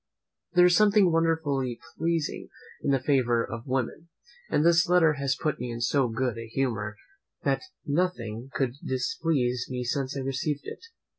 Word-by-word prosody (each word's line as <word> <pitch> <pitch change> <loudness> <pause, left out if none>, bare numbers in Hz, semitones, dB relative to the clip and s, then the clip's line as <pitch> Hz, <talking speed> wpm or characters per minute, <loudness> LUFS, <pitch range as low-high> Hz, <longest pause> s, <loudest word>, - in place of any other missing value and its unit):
There 180 0 +7
is 180 -1 +5
something 205 -2 +5
wonderfully 155 -7 0 0.2
pleasing 165 -2 -1 0.3
in - - -1
the 135 -1 +3
favour 125 -4 +2
of 115 +3 -7
women; 130 +6 -2 0.4
and 150 - +2
this 170 +1 +4
letter 170 -3 +5
has 135 -1 0
put 155 -3 -1
me 125 0 -4
in 115 - -5
so 130 +2 +2
good 115 0 -2
a 115 - -7
humour, 110 -4 -2 0.5
that 135 -1 +1 0.2
nothing 135 -8 -1
could 130 -3 -1
displease 130 -1 0
me 125 -1 -3
since 135 +3 -2
I - - -2
received 135 +2 -2
it. 455 - -8
135 Hz, 160 wpm, -27 LUFS, 125-165 Hz, 0.5 s, There